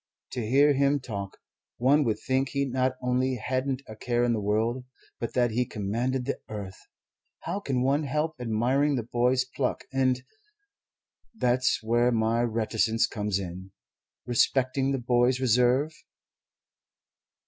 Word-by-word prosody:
To 125 - -3
hear 140 +6 +4
him 140 +1 +2
talk, 100 -6 -6 0.4
one 140 +5 +4
would 110 -2 0
think 130 0 0
he 140 0 0
not 130 0 0
only 125 +1 +1
hadn't 130 +3 -2
a 110 - -9
care 120 +2 0
in 120 -1 +2
the 110 - 0
world, 110 +5 0 0.4
but 115 - -4
that 120 -2 +2
he 120 +3 +1
commanded 120 +4 -2
the 140 - -2
earth. 100 -3 -8 0.5
How 175 +5 -3
can 130 -9 -1
one 140 +3 +2
help 150 +3 -1
admiring 125 +5 +1
the 120 - -2
boy's 125 +2 +1
pluck 130 0 -2
and 130 -1 +1 1.1
that's 125 - +1
where 120 +2 +2
my 115 0 +1
reticence 115 -1 +1
comes 105 -2 -2
in 95 0 -7 0.5
respecting 130 +2 +1
the 135 - 0
boy's 125 +1 +2
reserve?" 125 +4 +3
125 Hz, 140 wpm, -27 LUFS, 115-130 Hz, 1.1 s, hear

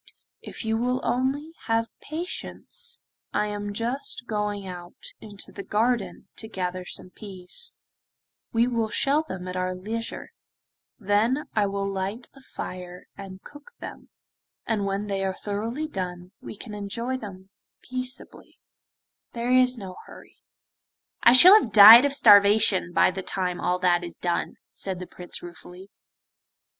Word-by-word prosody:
'If - - -8
you 220 0 0
will 250 +2 0
only 270 +5 -1 0.2
have 225 0 +1
patience 370 +8 -5 0.3
I - - +1
am 205 0 -4
just 240 +4 -3
going 210 -3 -3
out 175 -2 -9 0.2
into 205 -2 -11
the 200 - -7
garden 220 +2 -1
to 220 - -7
gather 185 -3 -4
some 180 - -8
peas: 195 - -5 0.8
we 230 +1 +3
will 230 -3 -1
shell 280 +7 +2
them 185 - -7
at 180 - -5
our 185 0 -2
leisure, 225 - -5 0.7
then 225 +7 +1
I 210 -2 +2
will 200 0 -2
light 195 +5 -4
a 270 - -17
fire 180 -7 -8
and 195 -1 -10
cook 290 +11 -14
them, - - -10 0.6
and 215 -3 -1
when 195 +1 -2
they 195 -1 -2
are 190 -1 -1
thoroughly 225 +9 -4
done, 180 - -6
we - - -9
can 215 0 -9
enjoy 230 +5 -3
them 195 -5 -9 0.3
peaceably; 255 0 -7 0.8
there 235 +1 -2
is 255 0 +4
no 190 -4 -8
hurry.' - - -15 0.9
'I 235 - +9
shall 355 +10 +10
have 225 - -5
died 220 +5 +11
of 285 - 0
starvation 205 -5 +5
by 175 - +4
the 190 - -5
time 180 -1 -3
all 180 0 +1
that 175 -1 +2
is 170 - -8
done,' 175 -1 -2 0.2
said 190 -2 -4
the 180 - -7
Prince 180 0 -8
ruefully. 180 +2 -12
205 Hz, 150 wpm, -25 LUFS, 185-240 Hz, 0.9 s, died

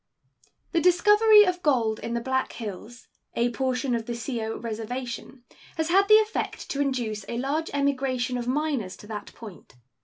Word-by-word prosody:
The 335 - +1
discovery 420 +5 +6
of 365 -2 -1
gold 235 -8 +1
in 235 +1 -4
the 235 - -1
Black 260 +1 -1
Hills, 220 +2 -8 0.3
a 240 +1 +1
portion 255 0 -1
of 230 -1 -2
the 240 - -3
Sioux 230 -2 -4
Reservation, 235 +2 -6 0.3
has 320 0 -1
had 390 +3 +4
the 430 - +8
effect 435 0 0
to 280 - -1
induce 240 -7 -2
a 235 - -3
large 290 +6 -1
emigration 265 -3 0
of 245 -1 -3
miners 265 -8 -1
to - - -13
that 210 -1 -7
point. 210 - -12
255 Hz, 165 wpm, -26 LUFS, 230-300 Hz, 0.3 s, the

